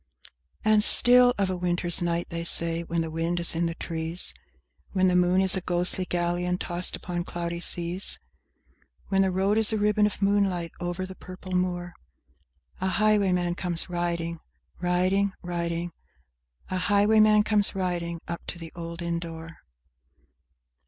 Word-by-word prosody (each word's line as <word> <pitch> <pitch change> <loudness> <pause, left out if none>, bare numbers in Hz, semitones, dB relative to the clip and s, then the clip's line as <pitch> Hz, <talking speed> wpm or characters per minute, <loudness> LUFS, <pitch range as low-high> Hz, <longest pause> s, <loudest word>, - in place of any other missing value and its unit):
X 70 -1 -22 0.3
And 215 -1 +5
still 245 +2 +8
of 195 -2 0
a - - -2
winter's 175 0 +1
night, 170 0 -2
they 170 0 -4
say, 170 0 +3
when 170 0 -3
the 165 -1 -5
wind 165 +2 -2
is 170 - +3
in 170 +1 0
the 165 - -5
trees, 165 +1 -5 0.6
When 185 -1 +2
the 180 - +1
moon 180 +1 +3
is 190 0 +5
a 190 - -2
ghostly 180 +1 0
galleon 175 0 -2
tossed 175 0 0
upon 175 -1 -5
cloudy 170 0 -5
seas, 175 +2 -2 0.9
When 195 -1 +2
the 190 - +2
road 195 +4 0
is 220 -1 +4
a 220 - -1
ribbon 210 0 +2
of 210 - -6
moonlight 195 -4 0
over 175 +1 -4
the 190 - -9
purple 185 0 -11
moor, 180 -1 -2 0.9
A 190 - -2
highwayman 190 -4 +1
comes 175 0 0
riding— 170 -1 -3 0.4
Riding—riding— 180 -2 -2 0.8
A 185 - -1
highwayman 210 +2 +3
comes 210 -2 +2
riding, 175 -3 -3
up 170 0 -5
to - - -6
the 165 -1 -9
old 170 0 -7
inn 170 0 -2
door. 165 -1 -9
180 Hz, 155 wpm, -25 LUFS, 170-190 Hz, 0.9 s, still